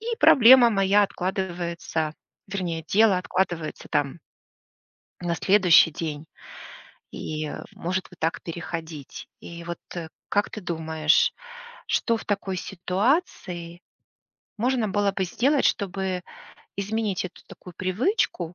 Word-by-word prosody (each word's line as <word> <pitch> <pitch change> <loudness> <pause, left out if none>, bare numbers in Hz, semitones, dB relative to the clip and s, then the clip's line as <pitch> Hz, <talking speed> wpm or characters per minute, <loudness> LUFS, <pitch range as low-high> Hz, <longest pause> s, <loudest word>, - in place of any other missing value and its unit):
и 460 +1 -3
проблема 245 -1 +8
моя 195 0 +4
откладывается. 175 -4 -3 0.3
Вернее, 175 -5 -3
дело 210 -2 +4
откладывается, 180 -3 -2
там 145 +1 0 1.0
на 175 -1 -1
следующий 185 -4 +5
день, 155 -1 -5 0.8
и, 155 -1 -4 0.2
может 185 +2 -2
вот 180 - -16
так 160 +1 -1
переходить. 165 -3 -7
И 170 0 -9
вот, 170 0 -5 0.2
э, 165 -2 -5 0.2
как 205 0 +1
ты 215 - -7
думаешь, 160 -3 +2 0.6
что 230 - +1
в - - -10
такой 200 -2 -2
ситуации 180 - -2 0.8
можно 245 -1 +1
было 200 0 +1
бы 190 -1 -1
сделать, 270 - +1
чтобы 190 -2 0 0.5
изменить 205 -1 -1
эту 185 - -9
такую 180 - -13
привычку 185 - 0
185 Hz, 115 wpm, -25 LUFS, 170-205 Hz, 1.0 s, проблема